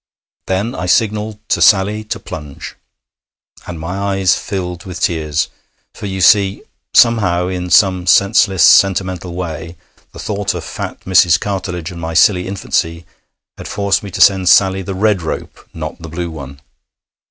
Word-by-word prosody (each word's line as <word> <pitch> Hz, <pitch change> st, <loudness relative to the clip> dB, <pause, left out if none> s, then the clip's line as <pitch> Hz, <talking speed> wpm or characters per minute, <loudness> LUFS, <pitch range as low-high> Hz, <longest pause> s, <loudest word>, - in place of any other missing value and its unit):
Then 100 Hz, +6 st, -1 dB
I 90 Hz, -, -5 dB
signalled 105 Hz, +2 st, 0 dB
to -, -, 0 dB
Sally 105 Hz, +1 st, +3 dB
to -, -, -5 dB
plunge, 75 Hz, -3 st, -9 dB, 0.9 s
and 85 Hz, -2 st, -7 dB
my 80 Hz, +4 st, -5 dB
eyes 95 Hz, -2 st, +1 dB
filled 90 Hz, -3 st, -5 dB
with 95 Hz, -4 st, -8 dB
tears. 75 Hz, -3 st, -1 dB, 0.5 s
For, 105 Hz, -, -7 dB
you 95 Hz, -1 st, -4 dB
see, 100 Hz, 0 st, +3 dB, 0.3 s
somehow, 95 Hz, -7 st, +3 dB
in 90 Hz, -1 st, -4 dB
some 90 Hz, 0 st, +3 dB
senseless 95 Hz, 0 st, +3 dB
sentimental 95 Hz, -2 st, +3 dB
way, 85 Hz, -1 st, -6 dB, 0.3 s
the -, -, -14 dB
thought 100 Hz, -2 st, -3 dB
of 85 Hz, -, -5 dB
fat -, -, -7 dB
Mrs. 90 Hz, -2 st, +4 dB
Cartledge 90 Hz, -4 st, -4 dB
and 85 Hz, -1 st, -9 dB
my 80 Hz, 0 st, -5 dB
silly 90 Hz, +1 st, +3 dB
infancy 85 Hz, -3 st, -2 dB, 0.5 s
had -, -, -8 dB
forced 100 Hz, -1 st, 0 dB
me 100 Hz, -, -8 dB
to -, -, -4 dB
send 95 Hz, -2 st, +4 dB
Sally 95 Hz, 0 st, +4 dB
the 95 Hz, +1 st, -6 dB
red 105 Hz, -1 st, +1 dB
rope, 80 Hz, -, -7 dB
not 80 Hz, 0 st, -7 dB
the 80 Hz, -, -8 dB
blue 85 Hz, +1 st, -5 dB
one. 70 Hz, -3 st, -10 dB
95 Hz, 155 wpm, -16 LUFS, 85-100 Hz, 0.9 s, Mrs